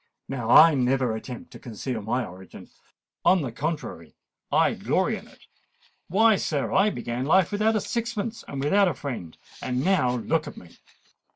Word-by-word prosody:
Now 120 -4 -4
I 160 +5 +8
never 130 -3 +1
attempt 120 +2 -8
to - - -11
conceal 120 0 -5
my 120 +4 -1
origin: 95 -1 -12 0.5
on 180 -3 +4
the 125 - -4
contrary, 145 - -5 0.4
I - - +3
glory - - 0
in - - -10
it. - - -20 0.6
Why, 220 +3 +4
sir, 145 -6 -2
I 195 +2 +4
began 120 - -4
life 170 +5 +3
without 215 +2 +1
a 215 - +1
sixpence, 235 -1 -3
and 140 -1 -4
without 195 +7 +4
a 175 - -1
friend: 120 - -6 0.2
and 125 +2 -2
now 130 -10 +2
look 155 +6 -1
at - - -9
me!" 85 - -12
140 Hz, 170 wpm, -25 LUFS, 120-190 Hz, 0.6 s, I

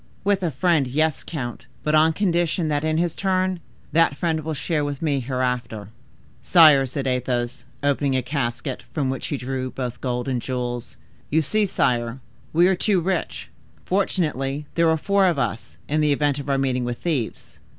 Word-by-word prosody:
"With 200 -1 +2
a 175 - +1
friend—yes, 155 0 +1
count, 125 -7 -6 0.2
but 150 - 0
on 155 +1 +5
condition 175 -3 +1
that, 145 0 0
in 155 0 +1
his 170 -1 +1
turn, 185 -1 0 0.3
that 165 -3 +3
friend 165 -2 0
will 160 0 -3
share 150 +1 -1
with 145 -1 -3
me 145 -4 0
hereafter!" 125 -5 -2 0.5
"Sire!" 155 -6 +6
said 135 +2 -4
Athos, 125 -1 -1 0.2
opening 140 -1 +1
a 130 - +1
casket, 130 0 -3
form 140 -4 0
which 135 - -4
he 145 - -2
drew 130 0 -3
both 125 -2 -5
gold 125 -1 -2
and 125 -3 -1
jewels, 125 -2 -4 0.3
"you 160 +2 +2
see, 210 +7 +1
sire, 120 -6 0 0.3
we 170 +3 +4
are 190 - +3
too 195 +1 +2
rich. 180 +1 -2 0.4
Fortunately, 150 -7 -1
there 170 -1 +3
are 160 - +3
four 200 +3 +3
of 170 -4 +1
us, 115 -3 -3
in 155 +2 +1
the 150 -1 +3
event 145 0 +1
of 140 0 -6
our 135 - +2
meeting 130 -2 0
with 120 0 -3
thieves." 120 - -3
145 Hz, 180 wpm, -23 LUFS, 130-165 Hz, 0.5 s, Sire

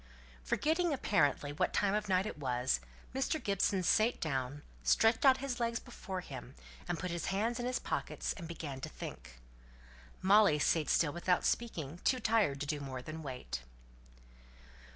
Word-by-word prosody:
Forgetting, 325 - +1
apparently, 145 - +1
what 150 - 0
time 200 -1 +2
of 210 -1 -1
night 185 +1 +3
it 215 - -5
was, 125 - +1 0.3
Mr. 270 +4 0
Gibson 195 -3 +1
sate 220 +7 +3
down, 140 -1 -2 0.2
stretched 225 - +3
out 260 -1 +7
his 265 -2 -3
legs 235 0 0
before 190 -7 -6
him, 130 -5 -9 0.3
put 175 0 -2
his 170 -1 -3
hands 220 +5 0
in 245 - -1
his 250 - 0
pockets, - - -2
and 175 -6 -8
began 150 -5 -6
to - - -4
think. 60 +1 -9 0.8
Molly 200 -4 +5
sate 155 +1 +2
still 150 -3 +3
without 180 +1 +1
speaking, 170 - -1
too 255 - +3
tired 215 - +2
to - - -1
do 145 +1 -2
more 130 -3 -6
than 155 +3 -6
wait. 125 - -5
175 Hz, 160 wpm, -34 LUFS, 145-225 Hz, 0.8 s, out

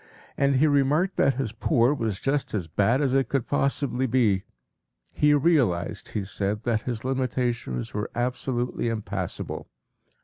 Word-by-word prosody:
And 140 0 +2
he 135 +4 +4
remarked 150 +5 +2
that 135 - +3
his 130 -4 -2
poor 120 +3 +2
was 110 -8 -2
just 140 -4 -1
as 95 -5 -1
bad 105 - +1
as 135 -3 +1
it 135 -1 +2
could 135 -4 0
possibly 135 -2 0
be. 110 -6 +2 0.7
He 150 0 +3
realized, 135 - +1
he 105 - -1
said, 100 +2 -2
that 115 -2 0
his 120 -1 -4
limitations 125 - -2
were 105 +1 -3
absolutely 125 0 -1
impassable. 100 -5 -4
125 Hz, 145 wpm, -26 LUFS, 105-135 Hz, 0.7 s, he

